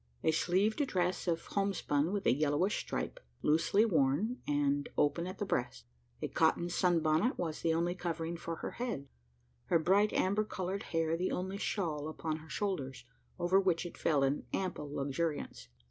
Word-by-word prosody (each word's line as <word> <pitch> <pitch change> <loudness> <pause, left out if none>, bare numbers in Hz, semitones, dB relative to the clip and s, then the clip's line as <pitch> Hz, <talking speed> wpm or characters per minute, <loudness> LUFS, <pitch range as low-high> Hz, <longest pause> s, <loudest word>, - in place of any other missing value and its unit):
A - - +4
sleeved 190 - +2
dress 180 -3 0
of 165 -1 0
homespun 185 -6 0
with 205 -1 -2
a - - +5
yellowish 150 +7 +1
stripe, - - -4 0.2
loosely 165 +8 +4
worn, 175 - +1
and 145 0 +1
open 150 +4 +2
at 185 - -6
the 205 - -2
breast. 125 -9 -2 0.4
A - - +1
cotton 165 +2 +2
"sun 175 -2 +3
bonnet" 155 - +2
was 160 -3 -3
the 165 -1 +2
only 170 +1 +1
covering 170 -2 -3
for 165 0 -4
her - - -5
head 230 - -4 0.6
her - - +3
bright 195 +6 +3
amber 200 +3 +2
coloured 195 -2 -3
hair 165 -1 +1
the 180 +2 -1
only 190 +2 -2
shawl 155 -9 -1
upon 155 0 -3
her 160 0 -13
shoulders, 135 -13 -3 0.3
over 180 +2 +3
which 180 -3 +1
it 175 - -7
fell 145 -4 +2
in 135 +2 0
ample 180 -6 -2
luxuriance. 140 - -2
170 Hz, 170 wpm, -33 LUFS, 150-190 Hz, 0.6 s, a